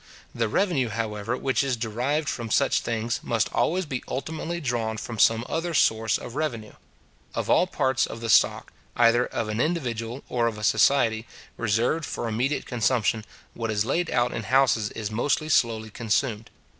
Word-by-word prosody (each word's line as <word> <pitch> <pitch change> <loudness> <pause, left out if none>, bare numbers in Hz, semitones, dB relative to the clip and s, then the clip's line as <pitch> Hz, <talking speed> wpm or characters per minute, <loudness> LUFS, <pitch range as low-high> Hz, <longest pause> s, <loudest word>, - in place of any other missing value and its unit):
The 115 -1 0
revenue, 135 - +1
however, 110 +1 -3
which 135 +1 +1
is 135 -3 -1
derived 125 +7 -1
from 115 -4 -3
such 140 +4 +3
things, 115 0 -2
must 115 -3 -1
always 185 +3 +1
be 130 -4 -4
ultimately 160 +4 -4
drawn 120 -6 -2
from 110 0 -6
some 115 +3 +4
other 165 0 -2
source 110 -5 +3
of 120 - -9
revenue. 125 -8 -3 0.6
Of - - -1
all 180 - +4
parts 130 -5 +1
of 115 - -7
the 115 - -4
stock, - - +3 0.2
either 120 +1 +4
of 115 - -3
an 110 +1 -3
individual 125 -6 -2
or 120 -1 +1
of 110 -2 -3
a 105 - -7
society, 115 0 +3 0.3
reserved 115 +8 0
for 120 - -4
immediate 125 +6 -1
consumption, 115 -2 0 0.3
what 115 -1 -4
is 105 -1 0
laid 165 +7 0
out 120 0 +1
in - - -3
houses 120 -3 +2
is 110 -1 -4
most 140 +7 0
slowly 110 -4 +1
consumed. 115 0 -1
120 Hz, 170 wpm, -25 LUFS, 110-135 Hz, 0.6 s, some